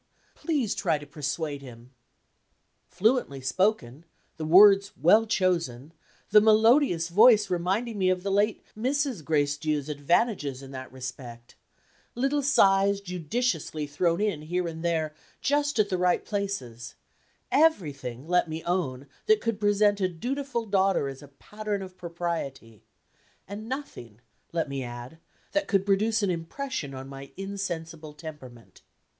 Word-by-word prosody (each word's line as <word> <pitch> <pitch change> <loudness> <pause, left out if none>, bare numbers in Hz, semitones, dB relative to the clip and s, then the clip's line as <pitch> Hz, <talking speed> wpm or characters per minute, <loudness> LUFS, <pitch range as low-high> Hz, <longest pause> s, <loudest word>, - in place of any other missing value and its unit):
Please 290 - -1
try 165 -4 0
to 145 - -10
persuade 145 0 -4
him." 125 -2 -13 1.0
Fluently 210 - +1
spoken; 135 - 0 0.3
the 160 - -4
words 195 +4 +6
well 210 +10 +5
chosen; 165 - -1 0.4
the 210 - +8
melodious 220 - +4
voice 210 +1 +6
reminding 195 +6 -1
me 185 -1 +3
of 180 -1 0
the 200 - -1
late 205 +2 +1
Mrs. 260 - -1
Gracedieu's 150 0 0
advantages 145 - 0
in 135 - -10
that 130 -2 -8
respect; 125 -2 -9 0.6
little 275 +4 +1
sighs 200 -7 +4
judiciously 180 - -2
thrown 165 +4 0
in 205 -8 -1
here 175 +3 -2
and 160 0 -6
there, 160 -3 0 0.3
just 290 0 0
at 210 -2 +2
the 185 -2 -1
right 180 0 +2
places; 130 - -4 0.6
everything, 145 - +1
let 180 -1 +2
me 160 +1 -5
own, 145 -7 -2 0.2
that 435 0 +5
could 230 -3 -2
present 205 -1 +2
a 185 - +3
dutiful 245 - -3
daughter 195 -7 +1
as 135 +1 -9
a 145 - -12
pattern 205 +8 -5
of 185 -1 -10
propriety 165 - -5 0.7
and 210 +4 -7
nothing, 120 - -7 0.3
let 165 -2 -1
me 140 -1 -4
add, 120 +5 -8 0.3
that 300 0 0
could 195 -2 +1
produce 215 +2 +2
an 195 - +2
impression 170 - -4
on 130 0 -8
my 135 0 -10
insensible 170 -6 -5
temperament. 145 -7 -11
175 Hz, 140 wpm, -27 LUFS, 145-210 Hz, 1.0 s, the